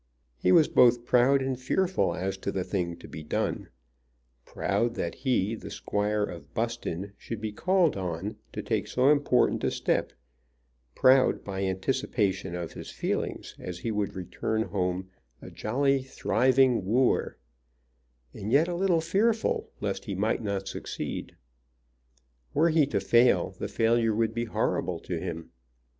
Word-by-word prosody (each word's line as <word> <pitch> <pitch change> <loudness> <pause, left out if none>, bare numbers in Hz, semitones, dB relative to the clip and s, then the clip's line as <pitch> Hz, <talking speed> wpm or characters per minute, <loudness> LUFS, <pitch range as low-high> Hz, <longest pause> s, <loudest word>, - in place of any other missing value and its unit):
He 90 - +3
was 155 - +6
both 120 -1 +4
proud 130 +3 +4
and 130 -1 -2
fearful 185 +8 +1
as 95 +1 -2
to 100 - -3
the 95 -2 -2
thing 85 -3 -2
to - - -12
be 80 - -8
done, 75 - -2 0.8
proud 120 0 -1
that 85 - -2
he, 115 -6 0
the 110 - -7
Squire 105 +1 -1
of 85 -7 -7
Buston, 105 -5 -3
should 115 - -6
be 110 0 -3
called 180 - +2
on 95 +1 -4 0.2
to - - -4
take - - -1
so 130 +3 +3
important 145 -4 +2
a - - +2
step; - - 0 0.8
proud 130 0 +4
by 95 -1 -4
anticipation 95 -2 -1
of 85 -2 -5
his - - -8
feelings - - -3
as 90 -1 -6
he 115 +6 -3
would 105 -2 -2
return 110 +4 -2
home 95 -1 -2 0.3
a - - -11
jolly 135 +4 +1
thriving 130 -2 +2
wooer, 120 +7 +1 1.0
and 105 +3 -5
yet 150 +6 +5
a 175 - -2
little 175 -2 +2
fearful 215 +7 +1
lest - - -3
he 100 - -4
might 105 +5 0
not 100 -2 -3
succeed. - - -5 1.2
Were 160 +4 +4
he 155 -3 +4
to - - 0
fail 120 +1 +3
the - - -2
failure 115 -1 +2
would 115 0 +1
be 120 0 -2
horrible 90 -5 -1
to 85 -2 -4
him. 85 -2 -6
110 Hz, 150 wpm, -28 LUFS, 95-130 Hz, 1.2 s, was